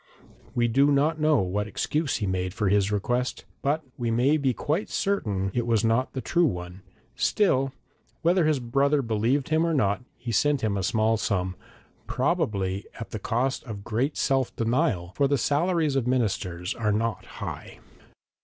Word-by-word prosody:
We 120 -1 +3
do 135 +5 +4
not 150 +3 +2
know 155 -4 +3
what 100 +3 -1
excuse 150 +7 -1
he 105 - -2
made 90 0 -2
for 105 -4 +1
his 100 0 +2
request, 120 +5 -1 0.2
but 150 +3 0 0.2
we 120 -1 -1
may 125 +6 +3
be 140 -3 +1
quite 155 - -2
certain 105 - -1
it 120 -1 -1
was 115 -1 +2
not 115 +3 +1
the 130 - -3
true 175 +4 +2
one; 90 -3 -5 0.3
still 135 -10 +2 0.5
whether 175 0 +3
his 155 -3 +2
brother 140 +4 +1
believed 115 +5 0
him 160 +1 +3
or 165 -1 +1
not, 100 -4 +1 0.2
he 120 0 -5
sent 145 +5 +2
him 110 -2 0
a 100 - -1
small 110 +3 +2
sum, 95 -4 -1 0.5
probably 110 - -1
at 115 - -7
the 110 - -4
cost 125 +6 -1
of 105 -5 -7
great 120 +7 -1
self 135 -2 +1
denial, 115 - 0
for 140 - +3
the 140 0 +2
salaries 155 +3 +1
of 130 -3 0
ministers 95 -8 -1
were 105 -2 0
not 110 +2 -1
high. - - -6
120 Hz, 170 wpm, -26 LUFS, 105-145 Hz, 0.5 s, do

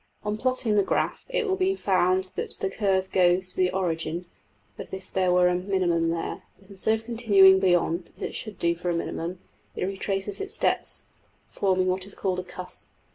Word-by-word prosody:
On 210 0 -1
plotting 255 -1 0
the 205 - +4
graph - - -1
it - - 0
will 380 -2 +1
be 380 0 +1
found 185 - +1
that - - -3
the 190 - -1
\DPPageSep{120.png}% - - -13
curve 190 -3 +1
goes 180 0 +3
to - - -7
the 185 -1 +2
origin, 170 -2 -2 0.5
as - - -7
if 190 0 -8
there 185 -1 +2
were 180 0 +5
a 180 - +2
minimum 180 -3 +1
there; 165 0 -3 0.2
but 195 0 -19
instead 200 +3 +2
of 225 - -7
continuing 200 -5 +6
beyond, 175 -2 +1
as - - -8
it - - -3
should 215 -4 -6
do 170 0 +2
for 175 +1 -3
a 170 - 0
minimum, 170 +1 -3 0.4
it - - -1
retraces 195 - -2
its 400 +2 -2
steps - - 0 0.4
(forming 185 -2 +1
what 185 +1 -1
is 200 - -8
called 185 -2 -1
a - - -4
``cusp''). 180 0 -9
190 Hz, 205 wpm, -26 LUFS, 180-205 Hz, 0.5 s, continuing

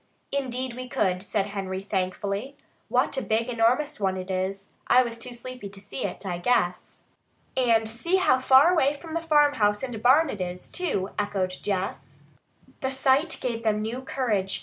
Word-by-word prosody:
"Indeed 255 -2 -2
we 255 0 -7
could," 185 -5 0
said 200 0 -1
Henry 190 -1 -4
thankfully. 200 +6 -3 0.3
"What - - +1
a - - +1
big, 225 0 0
enormous 245 +5 +1
one 190 -2 0
it 185 +1 -5
is! 190 +1 -3 0.2
I 255 - +6
was 235 -2 -4
too 240 +2 -8
sleepy 245 -3 -7
to 195 0 -12
see 200 +1 -5
it, - - -5
I 175 -2 -3
guess." 180 -4 0 0.5
"And 230 -4 +3
see 240 +12 0
how 260 -9 +4
far 265 +5 +6
away 290 -4 +3
from 320 +2 -10
the 335 - -1
farmhouse 290 -10 +3
and 240 -5 -4
barn 275 +6 +5
it 200 - -6
is, 180 0 -5
too!" 210 - -1
echoed 200 -3 -1
Jess. 195 -1 -4 0.6
The 265 - -1
sight 270 +4 +2
gave 235 -2 -2
them 215 -1 +1
new 235 +4 -3
courage. 215 -8 -1
230 Hz, 175 wpm, -26 LUFS, 195-265 Hz, 0.6 s, I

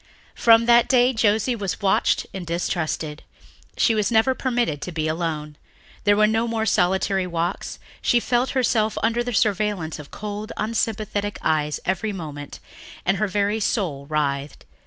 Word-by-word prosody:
From 230 0 +5
that 235 0 +5
day 250 0 +4
Josie 220 +2 +2
was 200 -4 -3
watched 195 -1 +2
and 190 - -5
distrusted. 165 -2 -2 0.6
She 230 - +3
was 210 -2 +1
never 235 +3 +3
permitted 240 - -1
to 180 - -5
be 160 -2 -2
alone. 155 -2 -3 0.5
There 205 0 +4
were 215 - +5
no 225 +2 +1
more 225 -1 -1
solitary 190 -1 +1
walks. 170 +2 -3 0.2
She 240 - +3
felt 245 +2 +1
herself 220 -4 +1
under 230 +1 +1
the 245 - -3
surveillance 205 -7 0
of 150 - -10
cold, 210 +1 -6
unsympathetic 215 -2 -2
eyes 150 -1 0
every 195 +3 -1
moment 145 -6 -7 0.5
and 195 +2 +2
her 215 +3 +1
very 205 +2 0
soul 160 -10 -1
writhed. 145 -2 -2
205 Hz, 155 wpm, -23 LUFS, 165-225 Hz, 0.6 s, From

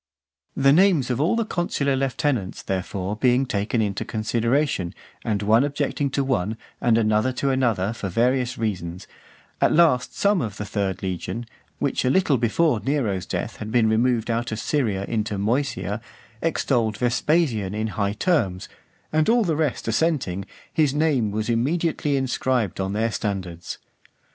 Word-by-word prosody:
The 135 0 +5
names 165 -7 +4
of 125 +2 0
all 170 +9 +2
the 230 -1 0
consular 145 -8 0
lieutenants, 130 -6 -1
therefore, 95 +1 -3
being 125 +3 +3
taken 110 0 0
into 100 -2 -2
consideration, 115 - 0 0.3
and 105 -3 -1
one 110 +5 +4
objecting 145 0 -1
to 140 +1 0
one, 110 -5 -1 0.2
and 115 -2 +3
another 110 +2 +2
to 135 +2 0
another, 115 -6 +1
for 105 -4 -4
various 125 +5 +1
reasons; 90 -5 -3 0.6
at - - +4
last 150 -7 +3
some 200 -3 +3
of 105 -3 -4
the 105 - -4
third 100 -2 -2
legion, 95 +5 -3 0.3
which - - 0
a 125 - +2
little 145 -4 +3
before 125 +2 +2
Nero's 105 -7 -1
death - - -3
had 110 0 -6
been 115 -1 +3
removed 115 +1 +2
out 115 +1 -1
of 110 - -2
Syria 110 -9 0
into 110 -2 -1
Moesia, 110 -1 -1 0.4
extolled 120 -9 0
Vespasian 120 - +1
in 110 +1 -1
high 100 -1 -1
terms; 110 - 0 0.5
and 155 +3 +3
all 235 0 +4
the 165 -6 0
rest 150 -7 -1
assenting, 115 - 0 0.3
his 150 -4 +2
name 145 -8 +2
was 105 +1 -2
immediately 145 +4 0
inscribed 130 -6 0
on 95 +1 -1
their 110 +2 0
standards. 90 -6 -4
115 Hz, 155 wpm, -23 LUFS, 105-140 Hz, 0.6 s, The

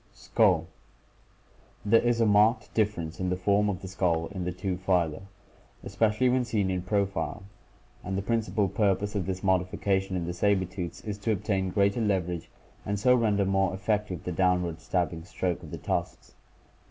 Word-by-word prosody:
Skull* - - +2 0.6
— - - -32
There 115 +2 +5
is 120 -1 +1
a 115 - +4
marked 105 +3 +3
difference 95 -7 -1
in 90 -1 -1
the 90 - +1
form 100 +3 +2
of 95 -1 -4
the - - -5
skull 85 -3 0
in 95 -3 -4
the 90 - -1
two 90 0 -3
phyla, 90 -4 0 0.6
especially 105 +5 +1
when 125 0 +2
seen 105 -5 0
in 90 -1 -1
profile, 100 +1 -1 0.6
and 95 +1 -3
the 100 - -2
principal 110 -2 0
purpose 100 0 0
of 100 -4 -2
this 95 0 -3
modification 95 +1 0
in 90 -2 -2
the 85 - -3
saber 95 +1 +2
tooths 90 -1 -6
is 105 -1 -5
to 110 +2 -1
obtain 95 -2 0
greater 100 +4 +1
leverage 90 -5 -1 0.3
and 100 0 -2
so 125 +4 +5
render 105 -5 +2
more 95 -1 +1
effective 105 -3 -2
the 90 - -3
downward 90 -2 +1
stabbing 85 -2 -1
stroke 90 -2 -3
of - - -10
the - - -6
tusks. - - -4
95 Hz, 175 wpm, -28 LUFS, 90-105 Hz, 0.6 s, There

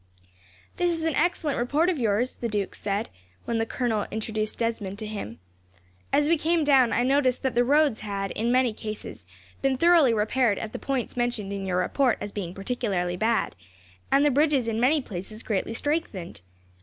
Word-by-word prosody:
"This 350 -1 +1
is 325 - -5
an 320 -1 +1
excellent 310 -4 0
report 290 +8 +2
of 355 -6 0
yours, 230 +2 +1
sir," - - -20
the 235 - 0
duke 205 -3 -2
said, 205 +2 -2 0.4
when 230 -1 -1
the 225 - 0
colonel 225 -4 -1
introduced 215 0 -3
Desmond 225 -4 -2
to 215 - -5
him. 200 - -6 0.7
"As 295 0 +3
we 330 0 +3
came 330 +1 +2
down, 270 -5 +5
I 240 - +2
noticed 260 -1 +2
that 265 -2 0
the 240 - +3
roads 285 -2 +3
had, 200 -2 -3
in 230 +2 -1
many 250 -2 +3
cases, 215 0 -8 0.3
been 270 -1 +1
thoroughly 335 -4 +5
repaired 220 0 +2
at 215 - -5
the - - -4
points 270 -3 -2
mentioned 240 -5 -1
in 195 -1 -4
your 180 -1 0
report 245 +7 +2
as 205 - -5
being 185 -4 -5
particularly 195 -5 -2
bad, 225 +4 0 0.6
and 280 +2 +5
the 295 - +4
bridges 285 -3 +2
in 225 -1 -1
many 275 +4 +3
places 210 +3 -7
greatly 220 +1 -2
strengthened. 290 - -3
235 Hz, 190 wpm, -26 LUFS, 210-275 Hz, 0.7 s, down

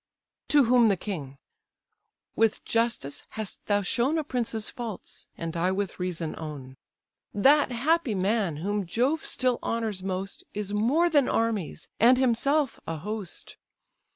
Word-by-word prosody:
To 290 -2 +5
whom 245 -1 +5
the 200 -3 +2
king. 150 -9 -6 1.0
"With 225 -1 +1
justice 225 - 0 0.2
hast 215 -3 -4
thou 205 -1 +2
shown 250 - +1
A 315 - 0
prince's 235 -5 -2
faults, 230 -6 -7
and 165 0 -5
I 170 +2 +1
with 195 0 -2
reason 175 -3 -2
own. 145 -5 -7 0.6
That 275 +6 +5
happy 270 0 +1
man, 195 -4 0
whom 205 -2 -1
Jove 260 - +1
still 255 -2 0
honours 220 -4 -2
most, 190 +1 -4
Is 205 -1 -3
more 260 +12 +3
than 290 -6 +3
armies, 220 -8 -1
and 245 +3 +6
himself 265 +3 +2
a 165 - -3
host. 205 +2 -6
220 Hz, 140 wpm, -27 LUFS, 185-250 Hz, 1.0 s, and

